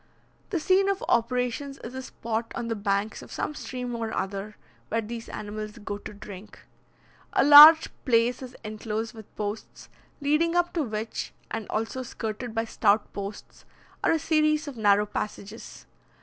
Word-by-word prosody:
The 355 - -1
scene 380 +4 +3
of 395 -1 -1
operations 250 +4 0
is 235 - -7
a 260 - -5
spot 230 -2 -4
on 235 - -3
the 225 - -1
banks 200 +1 -1
of - - -13
some - - -3
stream 250 -4 -5
or 225 -1 -3
other, 200 +2 -4 0.3
where 230 - 0
these 230 +1 -7
animals 215 +1 -6
go 205 -2 -5
to 215 - -9
drink. 205 -1 -11 0.8
A - - +4
large 300 +3 +11 0.2
place 240 -1 +2
is 255 -1 -9
enclosed 215 +1 -4
with 220 -3 -13
posts, 210 +1 -6 0.3
leading 305 +4 +2
up 350 0 +2
to 335 - 0
which, 220 -4 -4 0.2
and 225 -2 -4
also 225 +4 -2
skirted 230 -1 -5
by 225 0 0
stout 215 -1 +1
posts, 200 +1 -8 0.4
are - - +4
a - - +3
series 305 0 +1
of 285 - -6
narrow 210 -2 +3
passages. 210 +1 -6
230 Hz, 165 wpm, -26 LUFS, 215-275 Hz, 0.8 s, large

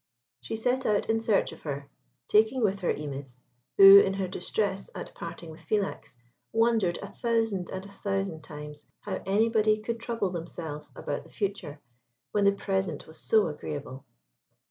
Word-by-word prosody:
She 120 - -5
set 250 +4 0
out 210 -1 +1
in 225 0 +1
search 225 -3 +2
of - - -12
her, 140 -2 -5 0.4
taking 220 +4 +3
with 200 -1 +1
her 180 - +1
Imis, 135 -4 -6 0.4
who, 195 0 +11
in 195 -1 +2
her 195 -1 -1
distress 195 +2 -2
at - - -7
parting 165 -2 -7
with 160 +2 -13
Philax, 195 -5 -2 0.4
wondered 225 -6 +2
a - - -7
thousand 225 -6 0
and 190 0 -5
a - - -11
thousand 195 -5 -3
times 150 0 -9 0.2
how - - -4
anybody 215 +1 +3
could 230 +2 -4
trouble 230 -5 -2
themselves 165 -3 -6
about 145 - -4
the - - -17
future 195 -8 -4 0.5
when 205 -1 +2
the 200 - +7
present 190 -5 -2
was 160 - -13
so 220 -2 +3
agreeable. 145 -3 -6
195 Hz, 165 wpm, -28 LUFS, 160-215 Hz, 0.5 s, who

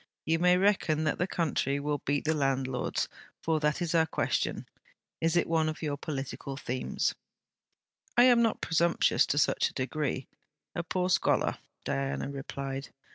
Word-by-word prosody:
You 165 +1 +2
may 180 +1 +5
reckon 185 -5 +2
that 155 - 0
the 180 - +1
country 145 -6 0
will 145 0 -1
beat 145 +2 -1
the 160 - +2
landlords 135 -3 0 0.4
for 160 -1 +1
that 150 +3 0
is 170 - -2
our 160 -1 +4
question. - - -1 0.5
Is 165 +1 +2
it 170 - +3
one 160 -1 +2
of 155 +1 -6
your 145 -2 -1
political 135 -1 -5
themes?' 130 -2 -1 1.0
'I 240 - +8
am 245 -2 +6
not 225 -2 +1
presumptuous 170 +1 +3
to 145 - 0
such 145 - +3
a - - -16
degree: 135 0 -2 0.5
a 175 - -1
poor 180 +2 -1
scholar,' - - +2 0.3
Diana 70 - -2
replied. 135 0 -5
155 Hz, 160 wpm, -30 LUFS, 135-170 Hz, 1.0 s, I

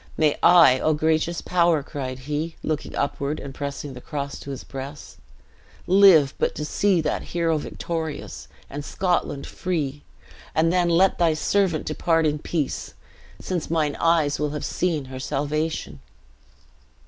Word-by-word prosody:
May 155 -2 +3
I, 165 -8 +7
O 155 +2 +2
gracious 160 +2 0
Power!" 170 -4 +2
cried 130 -3 -5
he, 150 +3 -3
looking 155 -2 -3
upward, 140 +1 -2
and 140 -1 -8
pressing 140 0 -5
the 125 - -10
cross 140 -1 -5
to - - -9
his 135 - -6
breast, 135 +2 -8 0.7
"live 180 -7 +6
but - - 0
to 150 - -3
see 190 +2 +2
that - - -1
hero 165 -2 0
victorious, 160 -1 -5 0.2
and 145 +1 -6
Scotland 175 -4 -1
free, 150 -6 -3 0.5
and 165 +2 +3
then 180 -1 +2
'let 180 +3 +3
thy 165 -2 +3
servant 185 -1 +1
depart 165 +1 +1
in 150 -1 0
peace, 150 -3 -3 0.4
since 180 -4 -3
mine 155 -3 0
eyes 165 -3 +2
will 150 0 0
have - - -5
seen 165 -6 -1
her 130 0 -8
salvation!'" 145 - -2
155 Hz, 150 wpm, -24 LUFS, 145-170 Hz, 0.7 s, I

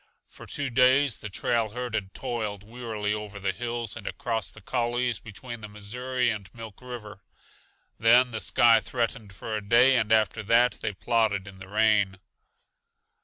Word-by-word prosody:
For - - -13
two 140 -2 -3
days 130 +1 +4
the 105 - -6
trail 115 +3 0
herd 125 -1 -4
had 95 -4 -3
toiled 105 -4 -4
wearily 110 -2 -3
over 105 -1 -6
the 95 0 0
hills 120 +1 -3
and 100 - -8
across 110 -6 -2
the 85 - -13
coulees 120 +1 -1
between 115 +2 -9
the 105 - -7
Missouri 125 +4 -2
and 100 -3 -6
Milk 110 -3 -10
River. 110 -5 -9 0.8
Then 120 +3 +5
the 110 -1 -3
sky 115 -2 +5
threatened 115 -2 -3
for 110 +3 -5
a 105 - -2
day, 120 +6 +5
and 110 -3 +1
after 110 0 +3
that 115 +4 +3
they 110 - -2
plodded 105 -2 0
in 95 -1 -11
the 95 - -10
rain. 105 -3 +2
110 Hz, 170 wpm, -27 LUFS, 105-120 Hz, 0.8 s, Then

